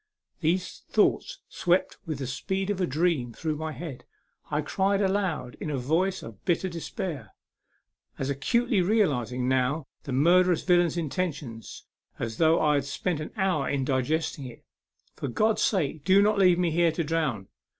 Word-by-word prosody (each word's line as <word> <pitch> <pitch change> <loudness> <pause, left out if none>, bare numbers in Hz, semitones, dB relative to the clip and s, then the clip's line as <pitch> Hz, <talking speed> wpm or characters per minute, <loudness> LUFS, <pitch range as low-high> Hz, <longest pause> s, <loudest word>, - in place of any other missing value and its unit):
These 175 +3 -1
thoughts - - +1
swept 180 +1 0
with 155 -3 -2
the 135 - -4
speed 190 +9 -2
of 195 -2 -2
a 180 - +1
dream 150 -5 0
through 155 +1 -3
my 160 0 -4
head. 155 -5 -7 0.5
I 150 0 0
cried 195 +5 +1
aloud 190 -10 -1
in - - -4
a 145 - -1
voice 170 +9 0
of 110 -4 -11
bitter 175 +2 +1
despair 165 - -5 0.8
as 135 - -2
acutely 205 - +1
realizing 135 - +1
now 130 +3 +1 0.2
the 140 - -5
murderous 175 +6 +4
villain's 175 -2 +3
intention 155 -7 -3 0.6
as 115 -1 -4
though 160 0 +4
I 150 -1 +3
had 140 -2 +1
spent 155 +3 -2
an 155 - -5
hour 185 -8 +1
in 135 -2 0
digesting 140 +2 -1
it 120 - -13 0.3
" - - -42
For - - -3
God's 215 - +1
sake, 160 -7 0
do 190 +3 +5
not 210 0 +2
leave 180 -3 +5
me 175 -2 +1
here 170 +1 +3
to 170 - -1
drown. 145 -11 -1
160 Hz, 170 wpm, -27 LUFS, 135-185 Hz, 0.8 s, do